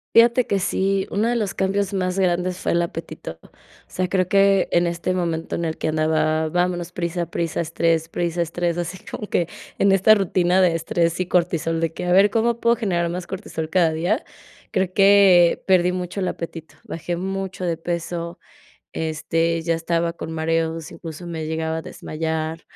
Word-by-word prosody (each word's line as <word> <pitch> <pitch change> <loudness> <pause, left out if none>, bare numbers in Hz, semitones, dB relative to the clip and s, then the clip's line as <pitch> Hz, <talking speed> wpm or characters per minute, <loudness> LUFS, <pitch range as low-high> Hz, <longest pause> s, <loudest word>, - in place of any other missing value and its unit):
Fíjate 235 +1 +6
que 200 - 0
sí, 195 +1 0
uno 210 +3 0
de 240 - +1
los 210 -4 -1
cambios 195 0 0
más 185 -1 -1
grandes 180 -1 +1
fue - - -1
el 170 - +2
apetito, 160 - -7
o - - -18 0.4
sea, 185 0 -2
creo 185 0 +1
que 195 0 +4
en 175 0 +3
este 170 +2 -2
momento 165 -2 -2
en 170 - -2
el 160 -1 -2
que - - -1
andaba, 155 0 +1
vámonos, 175 0 -1
prisa, 170 0 -2
prisa, 170 -1 -1
estrés, 165 0 0
prisa, 170 0 -1
estrés, 170 +1 -2
así 180 +2 -4
como 210 - -6
que 170 -4 0 0.3
en 200 - +4
esta 195 +3 +6
rutina 185 -2 +2
de 175 -2 +3
estrés 165 +1 0
y 185 - +1
cortisol, 170 -2 0
de 165 -1 -1
que, - - -5
a 180 - 0
ver, 195 +3 +6
¿cómo 235 +1 +1
puedo 235 0 +3
generar 175 -7 0
más 175 +1 -4
cortisol 170 -5 -5
cada 170 -3 +3
día?, 175 - 0 0.5
creo 185 -1 0
que, 195 -3 +6
perdí 180 -2 +4
mucho 180 +1 -4
el 185 - 0
apetito, 165 -4 -6
bajé 175 +1 -4
mucho 190 +1 -4
de 170 -2 -1
peso, 170 0 -4 0.6
este, 165 +1 -1
ya 165 0 +1
estaba 170 0 -1
con 165 -1 -7
mareos, 165 0 -1
incluso 165 +1 -9
me 160 -2 -4
llegaba 160 0 -2
a - - -6
desmayar, 160 +1 -4
175 Hz, 185 wpm, -22 LUFS, 165-190 Hz, 0.6 s, Fíjate